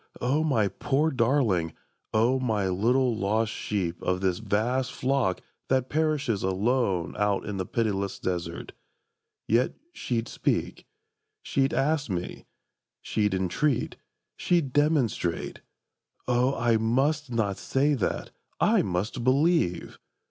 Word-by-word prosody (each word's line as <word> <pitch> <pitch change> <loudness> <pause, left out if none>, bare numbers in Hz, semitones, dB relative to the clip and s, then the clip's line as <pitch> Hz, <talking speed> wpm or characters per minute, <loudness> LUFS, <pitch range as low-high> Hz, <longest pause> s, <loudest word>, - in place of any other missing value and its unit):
O 140 +5 +1
my 120 -10 +2
poor 145 +9 0
darling, 115 - +1 0.4
O 120 +4 +2
my 110 -6 0
little 120 +6 +2
lost 110 +1 0
sheep 90 -5 -3
Of 90 0 0
this 95 -2 0
vast 115 +5 0
flock 130 -8 0 0.3
that 130 -1 +1
perishes 150 -8 0
alone 95 -2 0
Out 105 -1 +1
in 105 -2 -4
the 95 - -3
pitiless 100 -4 -1
desert!—Yet 90 +6 -4 0.2
she'd 115 -1 -2
speak: - - -2 0.6
She'd 135 0 +1
ask 145 -1 0
me: 90 -2 -4 0.6
she'd 105 -3 0
entreat: 110 - 0 0.4
she'd 165 -7 0
demonstrate. 145 - 0 0.7
O 125 +2 +2
I 115 -1 +2
must 135 +7 +1
not 105 -4 0
say 145 +3 +1
that! 125 -9 -2 0.3
I - - +4
must 100 +7 -2
believe! 135 - +1
115 Hz, 115 wpm, -27 LUFS, 100-135 Hz, 0.7 s, I